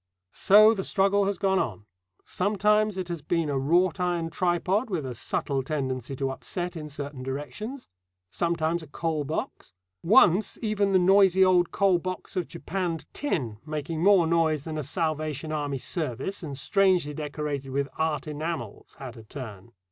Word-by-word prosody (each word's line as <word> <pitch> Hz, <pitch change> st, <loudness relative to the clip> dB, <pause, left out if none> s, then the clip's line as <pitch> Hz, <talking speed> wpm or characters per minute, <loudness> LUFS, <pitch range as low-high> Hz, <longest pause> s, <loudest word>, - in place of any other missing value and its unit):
So 215 Hz, +3 st, +6 dB
the 195 Hz, -3 st, -3 dB
struggle 200 Hz, +1 st, +2 dB
has 200 Hz, -1 st, -1 dB
gone 190 Hz, 0 st, +2 dB
on. 105 Hz, -3 st, -3 dB, 0.4 s
Sometimes 210 Hz, +1 st, +1 dB
it 185 Hz, -2 st, -3 dB
has 170 Hz, -3 st, -4 dB
been 165 Hz, -1 st, -1 dB
a 135 Hz, -, 0 dB
wrought 175 Hz, +6 st, +2 dB
iron 175 Hz, -2 st, -1 dB
tripod 185 Hz, +7 st, 0 dB
with 170 Hz, -8 st, -2 dB
a 130 Hz, -, -4 dB
subtle 135 Hz, +3 st, -2 dB
tendency 130 Hz, -2 st, -3 dB
to 135 Hz, 0 st, -2 dB
upset 175 Hz, +6 st, -4 dB
in 155 Hz, -2 st, -6 dB
certain 145 Hz, -2 st, -6 dB
directions; 150 Hz, -, -6 dB, 0.4 s
sometimes 170 Hz, -, 0 dB
a 160 Hz, -, -11 dB
coal 155 Hz, 0 st, -2 dB
box; 155 Hz, -, -5 dB, 0.3 s
once 200 Hz, 0 st, +4 dB
even 205 Hz, -2 st, +1 dB
the 190 Hz, -, +5 dB
noisy 190 Hz, 0 st, +5 dB
old 180 Hz, -2 st, +4 dB
coal 195 Hz, -3 st, +2 dB
box 185 Hz, +1 st, -6 dB
of 180 Hz, -, -1 dB
japanned 170 Hz, -2 st, -4 dB
tin, 125 Hz, -, -2 dB
making 155 Hz, +1 st, -4 dB
more 190 Hz, -2 st, +5 dB
noise 160 Hz, -3 st, +1 dB
than 155 Hz, -1 st, -4 dB
a -, -, -3 dB
Salvation 155 Hz, 0 st, -2 dB
Army 145 Hz, -2 st, -2 dB
service, 150 Hz, -, -3 dB
and 145 Hz, -5 st, -6 dB
strangely 185 Hz, -3 st, +2 dB
decorated 145 Hz, -2 st, -4 dB
with 140 Hz, +1 st, -1 dB
"art" 160 Hz, -3 st, -1 dB
enamels, 150 Hz, -7 st, -5 dB
had 130 Hz, -4 st, -8 dB
a 115 Hz, -, -11 dB
turn. 110 Hz, -3 st, -9 dB
165 Hz, 165 wpm, -26 LUFS, 145-185 Hz, 0.4 s, So